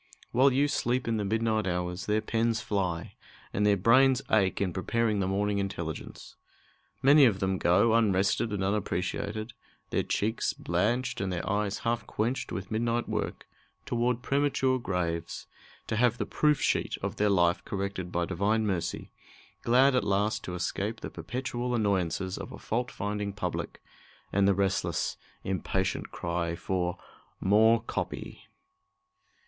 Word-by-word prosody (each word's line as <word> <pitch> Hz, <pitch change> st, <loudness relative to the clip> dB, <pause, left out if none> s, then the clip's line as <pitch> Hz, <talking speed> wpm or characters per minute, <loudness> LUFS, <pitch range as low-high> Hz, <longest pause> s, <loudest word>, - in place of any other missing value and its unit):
While 135 Hz, +3 st, +5 dB
you 140 Hz, +3 st, +3 dB
sleep 125 Hz, -3 st, 0 dB
in 115 Hz, -1 st, +1 dB
the 105 Hz, -, -1 dB
midnight 110 Hz, 0 st, 0 dB
hours, 90 Hz, 0 st, -2 dB
their 105 Hz, +1 st, +2 dB
pens 115 Hz, 0 st, 0 dB
fly, 90 Hz, -5 st, -2 dB, 0.4 s
and 105 Hz, +1 st, +2 dB
their 100 Hz, -1 st, +4 dB
brains 130 Hz, +6 st, +5 dB
ache 100 Hz, -4 st, +3 dB
in 95 Hz, -3 st, 0 dB
preparing 110 Hz, +3 st, 0 dB
the 95 Hz, -, 0 dB
morning 100 Hz, +1 st, 0 dB
intelligence. 90 Hz, -6 st, -5 dB, 0.7 s
Many 140 Hz, +1 st, +8 dB
of 105 Hz, -6 st, +2 dB
them 95 Hz, -1 st, 0 dB
go, 100 Hz, +6 st, +4 dB
unrested 105 Hz, -1 st, +2 dB
and 100 Hz, -2 st, -1 dB
unappreciated, 105 Hz, +2 st, -2 dB, 0.4 s
their -, -, +2 dB
cheeks 110 Hz, +3 st, -1 dB
blanched 110 Hz, +10 st, -1 dB
and 95 Hz, -1 st, -1 dB
their 85 Hz, -1 st, -3 dB
eyes 105 Hz, 0 st, 0 dB
half 115 Hz, 0 st, 0 dB
quenched 120 Hz, +5 st, -2 dB
with 95 Hz, +1 st, -5 dB
midnight 115 Hz, +2 st, 0 dB
work, -, -, -3 dB, 0.4 s
toward 120 Hz, 0 st, 0 dB
premature 135 Hz, -2 st, +1 dB
graves, 85 Hz, -5 st, -3 dB, 0.4 s
to 110 Hz, -, -2 dB
have 120 Hz, 0 st, +3 dB
the -, -, -2 dB
"proof 150 Hz, -2 st, +2 dB
sheet" -, -, 0 dB
of -, -, -3 dB
their 105 Hz, 0 st, +3 dB
life 85 Hz, -3 st, +3 dB
corrected 95 Hz, -2 st, -4 dB
by 85 Hz, -1 st, 0 dB
Divine 105 Hz, +6 st, +1 dB
mercy, 95 Hz, -5 st, -2 dB, 0.5 s
glad 130 Hz, +3 st, +4 dB
at 125 Hz, -, +2 dB
last 100 Hz, +2 st, 0 dB
to 90 Hz, -, -4 dB
escape 105 Hz, +5 st, -3 dB
the -, -, -6 dB
perpetual 120 Hz, +6 st, -3 dB
annoyances 95 Hz, -4 st, 0 dB
of -, -, -7 dB
a -, -, -8 dB
fault 120 Hz, +3 st, -2 dB
finding 105 Hz, 0 st, -3 dB
public, 95 Hz, -3 st, -4 dB, 0.5 s
and 100 Hz, 0 st, +4 dB
the 100 Hz, -, +4 dB
restless, 100 Hz, 0 st, 0 dB, 0.3 s
impatient 95 Hz, 0 st, -2 dB
cry 85 Hz, -1 st, -2 dB
for 90 Hz, 0 st, -2 dB, 0.4 s
"more 110 Hz, +3 st, +4 dB
copy." -, -, -5 dB
105 Hz, 150 wpm, -29 LUFS, 95-115 Hz, 0.7 s, Many